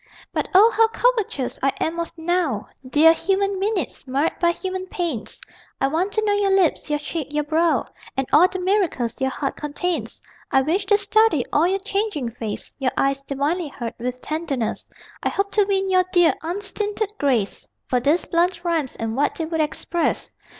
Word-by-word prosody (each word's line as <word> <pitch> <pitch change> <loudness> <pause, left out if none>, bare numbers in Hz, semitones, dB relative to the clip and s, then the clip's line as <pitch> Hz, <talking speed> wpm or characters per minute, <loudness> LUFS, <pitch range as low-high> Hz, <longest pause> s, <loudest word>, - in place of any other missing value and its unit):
But - - -1
O 430 +5 +8
how 450 +1 +4
covetous 445 - 0
I 275 - +3
am 330 +1 -1
of 335 - -3
NOW 325 - 0 0.2
Dear 315 +4 +6
human 390 +3 0
minutes, 385 - -2
marred 275 +5 +1
by 345 - +4
human 375 +1 -3
pains 335 -12 -3 0.4
I 270 - +2
want 350 +7 0
to 435 0 0
know 410 - +2
your 410 -1 +2
lips, 380 -5 +2
your 295 - +1
cheek, 295 0 -4
your 300 0 0
brow, 315 -3 +2 0.3
And 270 - +1
all 340 +5 +7
the 375 - -5
miracles 360 - 0
your 265 - +2
heart 275 +1 -3
contains, 295 -4 -2 0.3
I 265 - +3
wish 370 +7 0
to 410 0 +5
study 410 - +3
all 315 +4 +4
your 380 +2 +1
changing 395 - -2
face, 220 -3 -6
Your 260 -2 0
eyes, 275 0 +1
divinely 285 +5 -1
hurt 235 -5 -6
with 250 +1 -3
tenderness; 305 -7 -3 0.3
I - - 0
hope 400 0 -1
to 415 -2 +3
win 390 -1 +1
your 370 -1 +3
dear 350 -2 +5
unstinted 410 +4 -2
grace 245 -8 0 0.2
For 250 - +1
these 290 +8 +2
blunt 345 +1 +1
rhymes 330 -6 -1
and 225 0 -3
what 285 +3 +1
they 325 - -2
would 320 0 -1
express. 320 +2 -1
335 Hz, 185 wpm, -22 LUFS, 275-385 Hz, 0.4 s, O